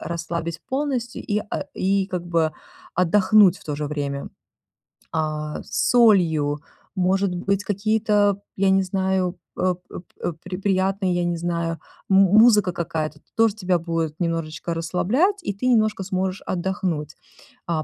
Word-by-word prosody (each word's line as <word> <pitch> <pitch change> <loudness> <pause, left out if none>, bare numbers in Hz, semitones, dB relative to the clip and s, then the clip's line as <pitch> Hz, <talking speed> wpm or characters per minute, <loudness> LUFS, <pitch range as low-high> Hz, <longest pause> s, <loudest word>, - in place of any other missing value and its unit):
расслабить 170 0 -4
полностью 265 -3 -2
и, 210 -1 0
э, 200 -2 -4
и 195 0 +1
как 180 -2 -4
бы 165 -2 +1 0.4
отдохнуть 185 +1 +5
в - - -18
то 150 -3 -3
же 150 0 -3
время. 140 -2 -3 0.8
А, 155 -1 -3
с - - -1
солью, 165 -11 +4 0.3
может 190 0 +1
быть, 195 +2 -1
какие-то, 205 -1 +1 0.2
я 195 0 +3
не 190 0 +4
знаю, 190 -1 -1 0.2
э 185 -1 +1
эп 175 - -9 0.2
эп 165 -2 -2
при 180 0 -5
приятные, 190 -1 +1
я 175 - 0
не 175 -1 -1
знаю, 170 -1 -2 0.3
му 195 +1 +5
музыка 210 -6 +6
какая-то 155 -2 -3 0.2
тоже 225 -2 +3
тебя 180 -4 0
будет 165 -2 -3
немножечко 165 -1 -2
расслаблять, 210 - +1
и 200 - -2
ты 225 +6 -3
немножко 215 -5 +2
сможешь 185 0 -2
отдохнуть. 175 -4 -2 0.5
А, 160 -2 -1
185 Hz, 145 wpm, -23 LUFS, 165-200 Hz, 0.8 s, музыка